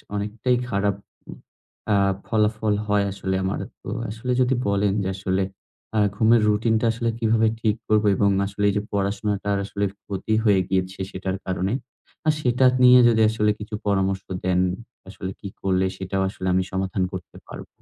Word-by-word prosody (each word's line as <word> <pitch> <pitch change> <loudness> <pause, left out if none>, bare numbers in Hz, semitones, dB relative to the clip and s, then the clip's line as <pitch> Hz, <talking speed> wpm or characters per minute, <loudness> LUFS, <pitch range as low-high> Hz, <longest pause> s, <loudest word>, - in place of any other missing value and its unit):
অনেকটাই 105 +5 0
খারাপ 100 -1 0 1.0
আ - - +4 0.3
ফলাফল 110 -1 +1
হয় 105 -1 +2
আসলে 95 -1 -3
আমার 95 +1 -1 0.2
তো - - -6 0.2
আসলে 115 +4 -4
যদি 130 +1 +2
বলেন 100 0 +2
যে 95 - -1
আসলে 95 0 -1 0.5
আ - - +4 0.2
ঘুমের 115 +2 +4
রুটিন 110 +2 +2
টা - - +1
আসলে 115 0 -1
কিভাবে 115 0 +3
ঠিক 110 -2 +2
করব 110 0 +3
এবং 100 +1 +3 0.2
আসলে 100 +1 -2
এই - - 0
যে - - +1
পড়াশোনাটা 100 +1 -1 0.2
আসলে 100 0 -2 0.2
ক্ষতি 100 +2 -3
হয়ে 100 -3 +5
গিয়েছে, 95 0 -1
সেটার 95 0 -3
কারণে। 95 +2 -1 0.5
আর 155 - +4
সেটা 125 -1 +2 0.2
নিয়ে 125 0 +9
যদি 110 -1 +3
আসলে 105 -1 +1
কিছু 105 +1 -6
পরামর্শ 95 -1 +1 0.2
দেন 90 -1 +2 0.5
আসলে 95 -1 -6
কি - - -7
করলে 95 -1 +1
সেটাও 95 +1 -2
আসলে 95 -1 -5
আমি 95 0 +2
সমাধান 95 0 -1
করতে 90 -3 -8
পারব। - - -9
100 Hz, 165 wpm, -23 LUFS, 95-110 Hz, 1.0 s, নিয়ে